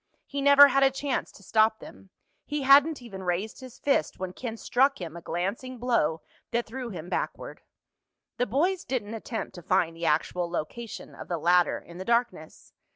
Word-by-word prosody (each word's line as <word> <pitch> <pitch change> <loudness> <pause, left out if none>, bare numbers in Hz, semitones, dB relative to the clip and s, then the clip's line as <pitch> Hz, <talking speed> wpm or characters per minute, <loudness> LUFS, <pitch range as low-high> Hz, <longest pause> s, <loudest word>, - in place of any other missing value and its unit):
He 280 0 -4
never 280 0 +8
had 275 +1 +2
a 270 - +6
chance 270 0 -3
to 200 - -16
stop 220 +2 +3
them. 195 - -13 0.4
He 295 -1 -2
hadn't 275 +1 +5
even 195 -5 -8
raised 185 +4 -2
his 255 -2 -11
fist 275 - 0
when 185 -1 -5
Ken 230 0 -6
struck 270 +5 +2
him 170 -3 -6
a 170 - -8
glancing 200 +11 -3
blow 220 -11 +1 0.3
that 235 0 -1
threw 250 +1 -6
him 175 -5 -7
backward. - - -4 0.8
The 245 - 0
boys 345 - +1
didn't 230 -5 -3
attempt 225 -1 -5
to 180 - -10
find 170 -1 +1
the 165 0 -3
actual 170 +3 0
location 210 +7 -6
of - - -10
the 175 - -2
ladder 175 +2 +3
in 175 +1 -12
the 185 - -6
darkness. 235 -9 -2
225 Hz, 185 wpm, -27 LUFS, 180-265 Hz, 0.8 s, never